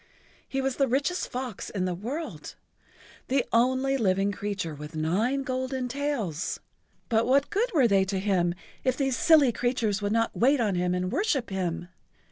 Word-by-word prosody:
He 270 - -1
was 265 -1 -1
the 275 - +3
richest 280 +8 0
fox 250 -5 -5
in 190 -3 -2
the 180 - -1
world—the 260 - -6
only 260 +3 +3
living 195 -3 +2
creature 200 -4 -3
with 150 +2 -9
nine 210 - 0
golden 260 -1 -2
tails—but 235 - -3
what 275 +2 +3
good 470 +5 +1
were 275 -9 +4
they 195 -3 +4
to 190 0 -2
him 185 -3 +1 0.3
if 255 -1 +1
these 270 -3 +1
silly 285 +1 +5
creatures 230 -3 0
would 205 0 -1
not 230 +1 +1
wait 270 +4 +3
on 215 -4 +1
him 180 0 0
and 180 +1 -2
worship 285 - 0
him? 175 -2 -3
235 Hz, 160 wpm, -27 LUFS, 190-270 Hz, 0.3 s, silly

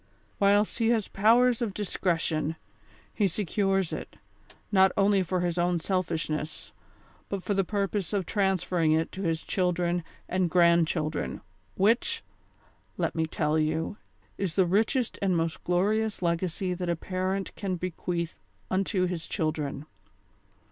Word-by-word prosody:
Whilst 205 +3 +3
he 225 - +2
has 225 -4 +2
powers 235 +4 +4
of 210 -5 -2
discretion, 165 -5 -1 0.6
he 205 - +2
secures 195 0 0
it, - - -6 0.6
not 190 -2 +5
only 200 0 +4
for 185 0 -1
his 175 0 -1
own 175 0 +2
selfishness, 160 - -2 0.6
but 195 -2 -3
for 205 - 0
the 195 -1 +2
purpose 200 0 -1
of 200 -3 0
transferring 185 -5 +1
it 160 +1 +1
to 190 - -6
his 165 -3 -1
children 180 -2 0 0.2
and 185 -1 +1
grand 170 -1 +5
children, 155 -2 -2 0.3
which, 220 +5 +2 0.7
let - - 0
me 160 -1 0
tell 155 0 0
you, 160 +6 -1 0.4
is 190 -4 -2
the 190 - +4
richest 220 +7 +1
and 190 -3 +2
most 165 -1 -2
glorious 205 +4 +1
legacy 175 +2 0
that 180 0 -3
a 170 - +2
parent 185 +3 -3
can 190 -3 -2
bequeath 175 -1 -3 0.4
unto 190 0 +1
his 175 -3 -4
children. 150 -3 -2
185 Hz, 140 wpm, -28 LUFS, 165-200 Hz, 0.7 s, not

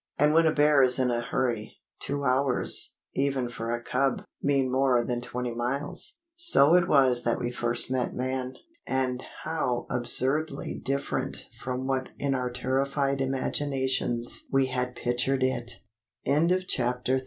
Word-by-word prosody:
And 150 +1 +4
when 165 0 +5
a - - +4
bear 150 -1 +4
is 125 -1 +4
in 130 -2 +2
a 120 0 0
hurry, 120 -3 -2 0.2
two 140 0 -2
hours, 130 0 0 0.2
even 135 -2 0
for 115 -1 -5
a 120 0 -1
cub, 125 +2 0 0.2
mean 135 -2 +1
more 130 -2 +3
than 120 0 -2
twenty 125 0 -4
miles. 140 - -3 0.2
So 330 - +6
it 175 -1 +5
was 130 -4 +4
that 115 - +1
we 120 - -3
first 120 +1 +2
met 130 -1 -1
man. 130 0 -3 0.3
And 130 -1 -1 0.2
how 125 -7 -1
absurdly 135 +5 0
different 140 +1 -3
from 130 0 -4
what 130 -1 -1
in 140 -1 -1
our 125 -1 -1
terrified 135 +2 -1
imaginations 130 -2 -1
we 135 0 +3
had 125 0 -2
pictured 125 +2 0
it! 125 -2 -1 0.5
CHAPTER 165 +5 +3
IV 185 0 -3
THE 125 -5 -1
FORES 130 +1 +2
130 Hz, 155 wpm, -27 LUFS, 125-140 Hz, 0.5 s, So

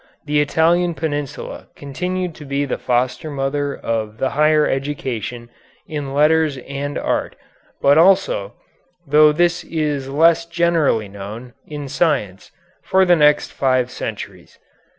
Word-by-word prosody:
The 150 0 +2
Italian 170 +3 +2
Peninsula 145 -3 -5
continued 180 +5 -4
to 150 - -12
be 140 0 -2
the 135 - -3
foster 125 +5 -1
mother 140 0 -2
of 110 -2 -3
the 130 - -1
higher 150 +1 +3
education 125 -4 -4 0.3
in 145 -3 -5
letters 155 -1 +3
and 140 +2 -5
art, - - -2 0.5
but 140 +2 +5
also, 180 - +3 0.5
though 150 +2 +5
this 175 +2 +1
is 150 -4 -2
less 165 +4 +3
generally 170 -10 +1
known, 105 +5 -9
in 145 -2 -6
science, 135 - -1 0.3
for 190 0 +3
the 175 -1 +5
next 150 -2 +3
five 130 -2 +1
centuries. - - -7
145 Hz, 130 wpm, -19 LUFS, 130-160 Hz, 0.5 s, but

